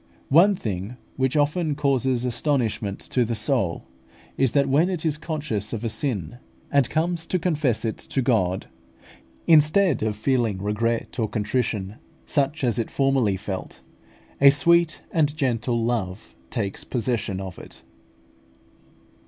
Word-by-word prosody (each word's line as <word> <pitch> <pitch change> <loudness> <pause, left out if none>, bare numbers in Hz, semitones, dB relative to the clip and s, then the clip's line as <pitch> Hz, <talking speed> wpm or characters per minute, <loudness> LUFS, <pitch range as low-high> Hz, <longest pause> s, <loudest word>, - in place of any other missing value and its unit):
One 180 +8 +6
thing 105 - -5 0.2
which 130 +2 0
often 150 +1 +1
causes 130 -3 +1
astonishment 115 -6 -1
to 125 - 0
the 115 0 -2
soul 110 - 0 0.5
is, 135 -3 +1
that 140 -1 +3
when 150 +7 +3
it 175 -4 -3
is 155 -2 +1
conscious 150 - -4
of 115 0 -4
a 115 - -1
sin, 115 - -3 0.3
and 140 -4 +3
comes 165 +1 -1
to 185 - 0
confess 150 -10 0
it 110 - -3
to - - -3
God, 105 -8 +1 0.8
instead 160 - +4
of 110 -1 -1
feeling 115 -3 0
regret 115 +5 -2
and 110 -2 -1
contrition, 105 -2 -2 0.3
such 145 +1 0
as 120 -1 +1
it 115 - -2
formerly 135 -8 +1
felt, 95 -1 -6 0.6
a 140 - +9
sweet 170 +3 +3
and 150 -2 +1
gentle 120 -4 0
love 110 -5 -3 0.2
takes 100 -6 -3
possession 115 -5 -2
of 95 -2 -7
it. - - -13
125 Hz, 140 wpm, -24 LUFS, 110-150 Hz, 0.8 s, a